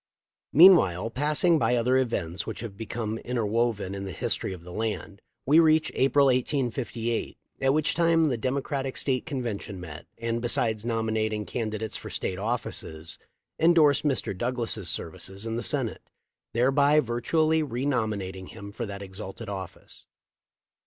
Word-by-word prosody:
Meanwhile, 115 - +6
passing 150 +5 +2
by 125 - +2
other 125 +2 +2
events 95 -9 -2
which - - -5
have 115 -4 -7
become 110 +1 -4
interwoven 115 -4 -1
in 100 0 -5
the 95 - -5
history 85 - -2
of 90 -3 -8
the 90 0 -10
land, 105 -2 -4 0.2
we 150 +5 +6
reach 160 -1 +4
April, 135 +2 +4
1858, 125 -3 -1 0.2
at 135 0 +4
which 155 +1 +1
time 165 -2 +3
the 125 - 0
Democratic 135 +2 -2
State 130 0 0
convention 115 - -4
met 85 -2 -9
and, 115 0 -2
besides 115 -2 0
nominating 110 -2 -1
can 115 0 -3
didates 110 0 -4
for - - -8
State 90 - -3
offices, 95 -8 -4 0.4
endorsed 160 -4 +5
Mr. 135 -9 0
Douglas' 115 -3 -2
services 95 +6 -6
in 115 0 -2
the 120 - -2
Senate, - - -1 0.5
thereby 140 +5 +4
virtually 155 +6 +1
renominat 115 -8 -1
ing 95 -1 -9
him 100 +1 -9
for 115 +2 -5
that 100 0 -6
exalted 95 +3 -8
office. 95 -3 -8
115 Hz, 145 wpm, -27 LUFS, 100-135 Hz, 0.5 s, Meanwhile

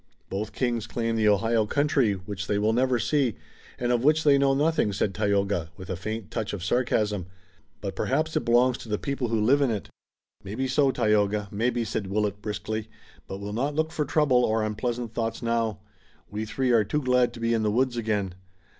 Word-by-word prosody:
"Both 105 +3 -3
Kings 120 -4 -1
claim 115 -1 -1
the 110 -1 +2
Ohio 110 +2 +2
country, 140 -5 +2
which 95 +1 -6
they 105 - +1
will 105 +2 +2
never 125 +1 +2
see, 120 0 +1 0.4
and 120 0 0
of 120 -1 +1
which 155 +3 +4
they 140 -2 +5
know 135 -1 +3
nothing," 150 -6 +2
said 95 0 0
Tayoga, 100 -5 0
with 95 -1 -7
a - - -1
faint 105 0 -5
touch 110 -3 -3
of 95 -4 -4
sarcasm, 105 -3 0 0.5
"but 100 -2 -4
perhaps 155 +8 0
it - - +1
belongs 120 +1 +3
to 115 - -10
the 105 - 0
people 140 -1 -2
who 115 -1 0
live 130 +7 +4
in 140 - +3
it." 105 -4 -3 0.5
"Maybe 110 +7 -3
so, 135 +1 +3
Tayoga! 105 -4 +1
Maybe!" 120 +3 0
said 100 -1 -3
Willet 105 0 -1
briskly, 105 +1 -4 0.4
"but 95 - -5
we'll 100 +1 -6
not 140 +6 -1
look 160 +1 0
for 150 - -1
trouble 145 -3 +3
or 110 -1 +1
unpleasant 115 +2 -3
thoughts 115 +1 -2
now. 115 -3 0 0.5
We 105 +1 -3
three 130 +3 0
are 115 -2 +5
too 150 +8 -2
glad 125 -1 +3
to - - -9
be 115 0 +1
in 115 - +1
the 105 - +1
woods 125 +3 +1
again. 105 -5 -1
115 Hz, 205 wpm, -26 LUFS, 105-125 Hz, 0.5 s, they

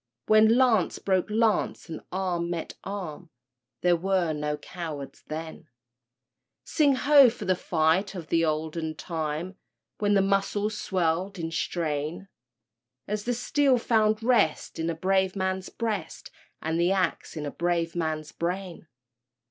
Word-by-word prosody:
When 220 +2 +5
lance 235 -8 +3
broke 190 0 0
lance 220 -3 +1
and 165 - -7
arm 180 -2 -1
met 170 -2 -4
arm— 180 -4 -6 0.5
There 175 -1 +4
were 180 -2 0
no 150 0 -2
cowards 155 -7 -7
then; 160 0 -7 1.0
Sing 290 -4 +3
ho! 280 -1 +7
for 220 -2 -7
the 185 0 +2
fight 170 +4 +1
of 170 -4 -7
the 165 0 +2
olden 155 0 -2
time, 160 +3 -4 0.4
When 205 -1 +2
the 195 - +4
muscles 200 +2 0
swelled 185 0 -1
in 165 -1 -4
strain, 165 +2 -2 0.8
As 210 0 -3
the 245 0 0
steel 270 +2 +2
found 220 -2 +2
rest 225 -13 +1
in 165 +1 -1
a 165 - -2
brave 190 +2 +1
man's 190 -1 -2
breast 220 -4 -4 0.3
And 160 +1 -1
the 175 +2 +3
axe 185 -3 -1
in 150 - -3
a 145 - -3
brave 170 -1 -1
man's 155 -2 -2
brain! 180 -1 -4
180 Hz, 140 wpm, -27 LUFS, 160-205 Hz, 1.0 s, ho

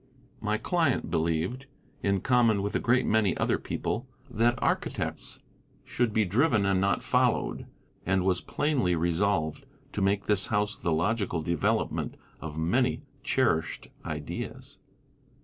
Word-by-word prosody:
My 105 0 0
client 160 - 0
believed, 85 +11 -1 0.3
in 100 -1 +1
common 115 -5 +3
with 100 - -2
a - - +3
great 125 +2 +2
many 105 -4 +2
other - - +1
people, - - -3 0.2
that 120 +3 +2
architects - - -2 0.4
should 120 -2 0
be 110 0 +2
driven 110 - +2
and 95 -1 +2
not 100 0 +1
followed, - - +1 0.4
and 95 0 +1
was 90 -2 +2
plainly 130 - 0
resolved 85 - 0 0.3
to 105 - -3
make 100 +1 +2
this 105 -2 +2
house 105 -1 0
the 85 - -2
logical 85 0 0
development 85 -1 0 0.2
of 80 -1 -7
many 125 - +1 0.2
cherished 100 - 0
ideas. 75 -2 -6
100 Hz, 130 wpm, -28 LUFS, 85-120 Hz, 0.4 s, common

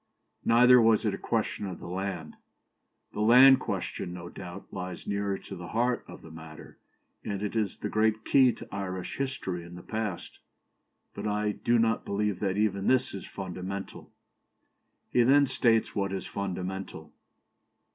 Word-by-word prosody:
" - - -50
Neither 125 +2 +6
was 110 -2 +4
it - - +1
a - - -3
question 100 - -2
of 95 - -6
the - - -11
land. 90 -3 -4 0.8
"The - - -6
land 125 +5 +8
question, 85 - -4
no 85 -1 -8
doubt, 90 +2 -9
lies 90 -2 -6
nearer 100 -1 -1
to - - -9
the 85 0 -8
heart 120 +2 0
of 90 - -12
the 80 - -12
matter, 80 -1 -12 0.4
and 100 0 -4
it 105 - -3
is 110 -3 -1
the - - -4
great 110 0 +1
key 130 -2 +5
to - - -11
Irish 95 -2 -4
history 125 -10 -3
in 85 +1 -11
the 90 - -10
past; 110 -5 -4 0.7
but - - -4
I 105 0 0
do 120 +3 +1
not 115 0 +2
believe 100 -2 -1
that 95 -1 -1
even 100 -2 0
this 130 -1 +2
is 100 - -7
fundamental." 95 +1 -6 1.0
He 125 - +4
then 140 +4 +5
states 120 -4 +2
what 100 -1 -1
is 95 - -4
"fundamental." 95 -4 -5
100 Hz, 165 wpm, -28 LUFS, 90-115 Hz, 1.0 s, land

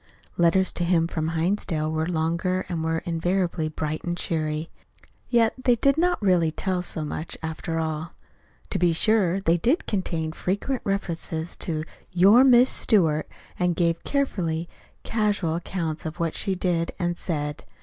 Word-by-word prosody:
Letters 175 +2 +3
to 175 - -1
him 170 -1 +3
from 160 -1 -2
Hinsdale 165 -2 0
were 160 0 -1
longer 170 +2 0
and 170 -3 -3
were 160 0 -1
invariably 170 -1 0
bright 155 0 -4
and 175 0 -2
cheery. 155 -1 -2 0.6
Yet 230 -2 +3
they 245 -2 +4
did 275 +4 +3
not 350 +2 +2
really 180 -4 +3
tell 180 +3 -1
so 160 -3 -4
much, 155 +2 -4
after 160 +1 -3
all. 160 0 -3 0.6
To - - 0
be 175 -1 +3
sure, 195 0 +3
they 170 -3 +2
did 250 - +1
contain 165 -6 -2
frequent 205 +10 -2
reference 170 -4 -3
to 155 -2 -2 0.3
"your 195 +7 +6
Miss 255 -1 +6
Stewart," 160 -8 +2 0.3
and 180 -1 +1
gave 170 -1 +1
carefully 175 - -1 0.4
casual 205 -7 0
accounts 165 -2 -3
of 160 +3 -7
what 165 -1 0
she 195 - -1
did 175 -2 -1
and 175 -1 -1
said. 150 -4 -3
170 Hz, 155 wpm, -25 LUFS, 160-190 Hz, 0.6 s, your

